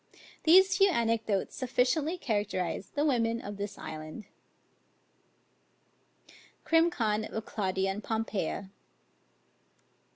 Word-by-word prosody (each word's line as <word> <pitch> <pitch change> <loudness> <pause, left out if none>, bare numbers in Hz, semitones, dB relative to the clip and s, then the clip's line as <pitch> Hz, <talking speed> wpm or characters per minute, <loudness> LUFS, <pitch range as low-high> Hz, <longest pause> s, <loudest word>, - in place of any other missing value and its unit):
These 380 +4 +6
few 390 0 +5
anecdotes 225 - 0
sufficiently 270 +6 0
characterise 205 - -2
the 290 +1 0
women 230 -5 +1
of 205 -2 -7
this 200 0 -5
island. 155 +7 -8 2.4
CRIM. 330 +1 +4
CON. 220 -9 0
OF 220 0 -5
CLAUDIUS 190 -2 -1
AND 195 +2 -3
POMPEIA. 205 -4 -3
225 Hz, 95 wpm, -30 LUFS, 200-285 Hz, 2.4 s, These